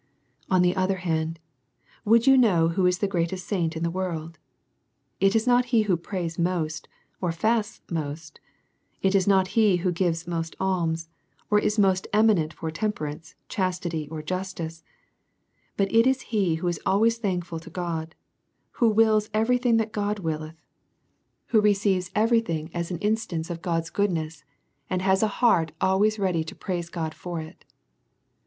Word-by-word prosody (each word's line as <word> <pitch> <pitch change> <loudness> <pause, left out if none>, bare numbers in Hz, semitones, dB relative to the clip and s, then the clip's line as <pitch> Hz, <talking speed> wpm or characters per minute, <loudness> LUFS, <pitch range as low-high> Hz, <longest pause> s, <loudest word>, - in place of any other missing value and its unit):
On 185 -1 +4
the 180 0 +2
other 190 0 +1
hand, 165 -3 -2 0.7
would 230 +2 +4
you 270 0 +7
know 185 -10 +4
who 180 +2 +2
is 180 0 +2
the 200 - 0
greatest 180 -1 -2
saint 165 -5 -1
in 160 - -3
the 170 - 0
world? 165 -3 -4 0.8
It 195 +2 +3
is 225 +1 +2
not 250 0 +4
he 235 -3 +3
who 195 -4 +2
prays 170 -1 -4
most, 165 -3 -1 0.3
or 180 -2 0
fasts 215 +5 -1
most; 155 -1 -5 0.6
it 190 0 +3
is 195 -1 +2
not 190 -2 +4
he 215 -3 +4
who 180 - +3
gives 170 -1 -1
most 165 -1 -4
alms, 165 -4 -1 0.4
or 210 - +5
is 210 +1 0
most 190 -2 +2
eminent 210 -8 +3
for 160 -1 -5
temperance, 160 -4 -4
chastity, 175 -5 -2
or 155 -1 -6
justice; 170 -2 -5 0.9
but 195 0 0
it 230 +2 +5
is 265 0 +2
he 190 -6 +2
who 165 +2 -3
is 175 -2 -1
always 225 +4 +2
thankful 175 -6 -2
to 165 - -12
God, 165 -2 -4 0.6
who 235 - +2
wills 215 -1 +3
every 235 +3 +2
thing 240 -2 +3
that 220 -1 -1
God 210 0 -1
willeth, 160 -3 -4 0.9
who 220 -3 +4
receives 200 -3 +2
every 225 +2 +4
thing 160 -6 -4
as 170 -1 -3
an 175 - -3
instance 205 -6 -1
of 170 -1 -6
God's 165 -2 -2
goodness, 165 -7 -1 0.5
and 185 0 -1
has 190 0 +3
a 220 - +3
heart 200 -8 +2
al 190 0 +2
ways 215 +1 +3
ready 185 -5 0
to 160 - -8
praise 175 -3 -4
God 160 -3 -4
for 175 0 -6
it. 155 0 -10
185 Hz, 170 wpm, -25 LUFS, 165-210 Hz, 0.9 s, you